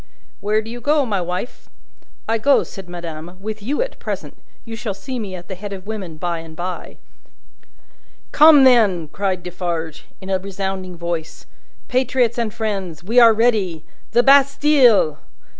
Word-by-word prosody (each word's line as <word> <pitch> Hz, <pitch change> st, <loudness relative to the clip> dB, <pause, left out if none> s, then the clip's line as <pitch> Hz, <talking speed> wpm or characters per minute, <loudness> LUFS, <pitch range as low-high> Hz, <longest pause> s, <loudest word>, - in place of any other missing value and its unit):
"Where 215 Hz, +2 st, 0 dB
do 225 Hz, -, -8 dB
you 240 Hz, 0 st, -8 dB
go, 290 Hz, 0 st, +2 dB
my 205 Hz, -5 st, -1 dB
wife?" 180 Hz, +7 st, -5 dB, 0.6 s
"I 225 Hz, 0 st, 0 dB
go," 275 Hz, +5 st, +4 dB
said 190 Hz, -3 st, -11 dB
madame, 170 Hz, 0 st, -8 dB
"with 215 Hz, +2 st, -6 dB
you 280 Hz, -, 0 dB
at -, -, -9 dB
present. -, -, -5 dB, 0.3 s
You 230 Hz, -1 st, -7 dB
shall 225 Hz, -3 st, -4 dB
see 255 Hz, +5 st, -6 dB
me 200 Hz, -4 st, -5 dB
at 175 Hz, -1 st, -10 dB
the -, -, -6 dB
head 200 Hz, +2 st, -7 dB
of 190 Hz, -1 st, -9 dB
women, 195 Hz, -7 st, -6 dB
by 170 Hz, 0 st, -2 dB
and 165 Hz, -1 st, -11 dB
bye." 180 Hz, +2 st, -6 dB, 1.3 s
"Come, 300 Hz, -2 st, +7 dB
then!" 210 Hz, -, +4 dB
cried 190 Hz, -1 st, -2 dB
Defarge, 170 Hz, -3 st, -5 dB
in 190 Hz, 0 st, -7 dB
a 190 Hz, -, +1 dB
resounding 190 Hz, -1 st, -5 dB
voice. 170 Hz, -2 st, -5 dB, 0.4 s
"Patriots 250 Hz, -2 st, +1 dB
and 230 Hz, -2 st, -1 dB
friends, 195 Hz, -8 st, -4 dB
we 230 Hz, +7 st, +3 dB
are 230 Hz, -1 st, +8 dB
ready! 210 Hz, -8 st, +1 dB, 0.3 s
The 240 Hz, +1 st, +4 dB
Bastille!" 275 Hz, -, +4 dB
200 Hz, 160 wpm, -20 LUFS, 180-235 Hz, 1.3 s, are